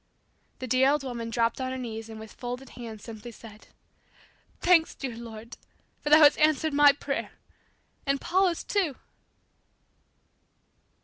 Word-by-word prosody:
The 255 - -6
dear 255 +2 +3
old 290 0 +1
woman 235 -3 -5
dropped 230 +2 0
on 260 - -2
her 260 - -4
knees 225 -3 -6
and 220 -1 -9
with 220 0 -11
folded 250 +2 -6
hands 225 -3 -9
simply 230 0 -9
said, 220 -1 -14 0.9
"Thanks, 350 -2 +4
dear 255 -4 -5
Lord, 230 0 -10 0.4
for 295 - -3
Thou 300 - +8
hast 290 0 +6
answered 310 0 +2
my 290 0 +7
prayer, 280 0 -4 0.7
and 275 0 +1
Paula's 365 0 +1
too!" 365 -10 0
255 Hz, 140 wpm, -27 LUFS, 230-290 Hz, 0.9 s, Thou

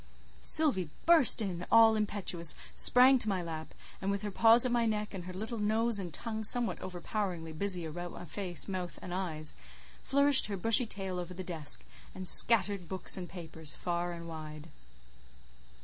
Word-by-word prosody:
Sylvie 220 - +1 0.2
burst 320 -9 +5
in 180 -3 -7
all 225 -1 +5
impetuous, 200 -6 -1 0.2
sprang 255 +1 +5
to 215 - +3
my 185 -3 -3
lap, 160 -2 -9 0.3
and 195 - -4
with 200 +1 -4
her 205 - -5
paws 230 +5 +5
at 250 - -2
my 235 -1 -1
neck, 210 -1 -4
and 180 -3 -9
her 185 - -9
little 220 +4 -7
nose 220 +1 -1
and 180 -3 -8
tongue 220 +4 -7
somewhat 240 +2 +1
overpoweringly 180 -2 -6
busy 180 0 -3
about 175 +2 -8
my - - -11
face, 175 -3 -4
mouth, 185 -2 -6
and 180 - -8
eyes, 160 -5 -5 0.5
flourished 280 0 +6
her 200 -2 -6
bushy 225 +5 +3
tail 190 -3 -7
over 180 +1 -9
the 185 - -8
desk, 160 -5 0 0.3
and 185 -1 -3
scattered 200 -4 +5
books 190 -1 +3
and 180 -2 -7
papers 160 -4 -6
far 175 0 -5
and 170 -1 -10
wide. 155 -1 -11
190 Hz, 175 wpm, -29 LUFS, 175-220 Hz, 0.5 s, flourished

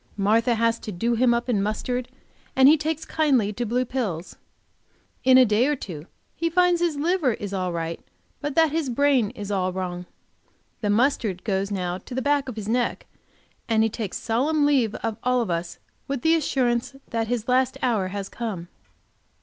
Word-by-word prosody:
Martha 225 +4 +3
has 230 0 +1
to 215 - -6
do 230 +6 0
him 240 +1 +3
up 235 +1 0
in 220 -5 +1
mustard, 245 +4 -2 0.5
and 265 0 +7
he 300 - +8
takes 315 +1 -3
kindly 265 -10 +1
to 240 +3 -3
blue 250 +3 0
pills. 210 -10 -3 0.9
In 255 0 +7
a 260 - +7
day 220 +4 +3
or 295 - +1
two 170 - -8 0.3
he 335 0 -1
finds 355 0 +3
his 340 -3 +1
liver 310 -3 +1
is 200 -2 -6
all 185 -2 -1
right, 165 -1 -3 0.4
but 290 -1 -3
that 320 -2 +4
his 315 -3 -1
brain 260 -3 +2
is 205 -3 -6
all 185 -2 0
wrong. 180 -1 -4 0.7
The 210 - -2
mustard 215 -4 +1
goes 195 -1 -1
now 180 -2 -2
to 245 - -9
the - - 0
back 285 -2 +1
of 245 - -6
his 215 -2 -6
neck, 240 +2 0 0.6
and 220 -1 +3
he 225 - +2
takes 215 -3 -4
solemn 285 +7 +1
leave 260 -7 +2
of 225 -2 -2 0.3
us 170 +1 -3
all, - - -39 0.3
with 275 -3 -3
the 320 - +4
assurance 260 -5 0 0.2
that 225 -1 -1
his 235 -1 -2
last 255 0 +2
hour 220 -7 +1
has 195 +1 -5
come. 195 -8 -5
235 Hz, 190 wpm, -24 LUFS, 200-270 Hz, 0.9 s, he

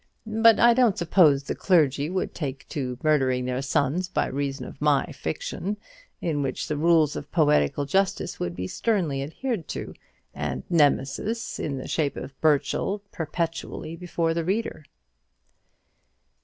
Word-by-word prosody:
But 225 +1 +5
I 240 0 +7
don't 235 -5 +3
suppose 160 -5 +4
the - - -3
clergy 150 -5 +2
would 185 +1 -2
take 140 -3 -5
to 125 -4 -3
murdering 130 -5 +2
their 125 +1 -1
sons 145 +6 0
by - - 0
reason 135 -1 -3
of - - -11
my 150 -2 +3
fiction, 210 - -4 0.4
in 155 -4 -1
which 135 -2 -2
the 150 - -1
rules 160 -1 +3
of - - -7
poetical 145 - +2
justice 195 +5 0
would 85 -1 -3
be 90 - -4
sternly 165 - 0
adhered 175 - -3
to, - - -5 0.4
and - - -3
Nemesis, 165 - +1
in 140 -3 -2
the 130 - -6
shape 150 -3 -1
of 140 - -7
Burchell, 160 +6 +1
perpetually 165 0 -4
before 165 -1 -1
the 165 0 -1
reader." 190 -4 -2
155 Hz, 145 wpm, -25 LUFS, 140-185 Hz, 0.4 s, I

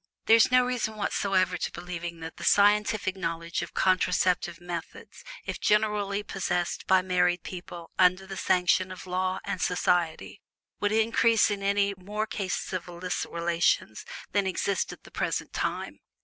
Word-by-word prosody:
There 225 - +7
is 230 - +5
no 255 0 +5
reason 245 -3 -2
whatsoever 190 -3 0
for - - -1
believing 175 -1 -6
that 160 0 -8
the - - -8
scientific 205 -1 +3
knowledge 170 -1 -3
of - - -7
contraceptive 180 -2 +1
methods, 175 -2 -8 0.2
if - - -4
generally 210 -1 +1
possessed 180 -3 -2
by 190 -1 +4
married 180 -1 +1
people 175 -2 -8
under 185 +1 +4
the 195 0 -7
sanction 185 +1 +2
of 185 - -8
the 185 - -11
law 185 0 0
and 180 - -3
society, 180 0 0 0.4
would 205 - +1
result 225 0 +3
in 200 -1 -3
any 200 0 +1
more 205 +4 -3
cases 195 -3 -3
of 185 -1 -3
illicit 175 +1 -4
relations 170 -10 0 0.3
than 200 -2 +1
exist 190 +1 -1
at - - -12
the - - -15
present - - -2
time. - - -3
185 Hz, 160 wpm, -27 LUFS, 175-205 Hz, 0.4 s, There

